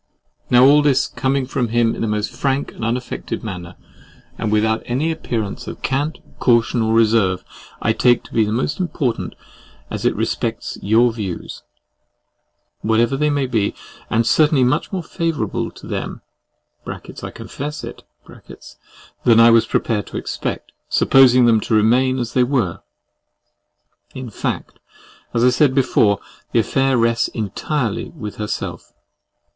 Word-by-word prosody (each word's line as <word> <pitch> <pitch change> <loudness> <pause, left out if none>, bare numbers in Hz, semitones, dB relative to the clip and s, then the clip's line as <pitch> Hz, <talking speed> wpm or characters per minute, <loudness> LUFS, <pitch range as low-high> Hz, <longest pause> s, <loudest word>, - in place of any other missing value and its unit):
Now 125 +1 +6
all 145 +2 +6
this, 145 -3 +3
coming 135 0 -1
from 125 -1 -1
him 115 0 +2
in - - -6
the 115 - 0
most 105 0 -1
frank 135 +3 -1
and - - -8
unaffected 125 +2 -3
manner, 90 -5 -7 0.6
and 110 - -2
without 110 +1 +2
any 140 +7 0
appearance 110 -9 -4
of - - -8
cant, 145 +3 -1 0.2
caution, 115 -1 +3
or 110 0 +1
reserve, 110 -5 +3 0.4
I 115 - +3
take 120 +1 +3
to - - -15
be 110 -2 +2
most 130 - -1
important 145 -10 -2 0.6
as - - -4
it - - +2
respects - - -2
your 115 +3 +3
views, 100 -6 -6 1.2
whatever 115 +4 +2
they 150 +2 +1
may 145 -2 +1
be; 110 -5 0 0.3
and 115 +1 +2
certainly 150 0 +4
much 135 +5 +1
more 185 -3 -3
favourable 165 -10 -2
to - - -14
them - - -5 0.7
(I - - -5 0.3
confess 150 +2 -7
it) - - -8 1.2
than 115 -2 +5
I 115 0 +8
was 115 -1 +4
prepared 105 -4 -1
to - - -6
expect, - - -4 0.2
supposing 130 -2 +5
them 115 -2 +5
to 110 - -1
remain 125 +5 +3
as 120 -3 -3
they 125 - +4
were. 120 -10 -1 1.3
In 130 -3 -7
fact - - -4 0.5
as 120 -1 +1
I 125 - +6
said 130 +1 +3
before, 105 -6 +3 0.3
the - - +4
affair 135 -1 +1
rests 115 0 +2
entirely 110 - -3
with 105 -10 -8
herself. 105 -1 -5
120 Hz, 145 wpm, -20 LUFS, 110-135 Hz, 1.3 s, I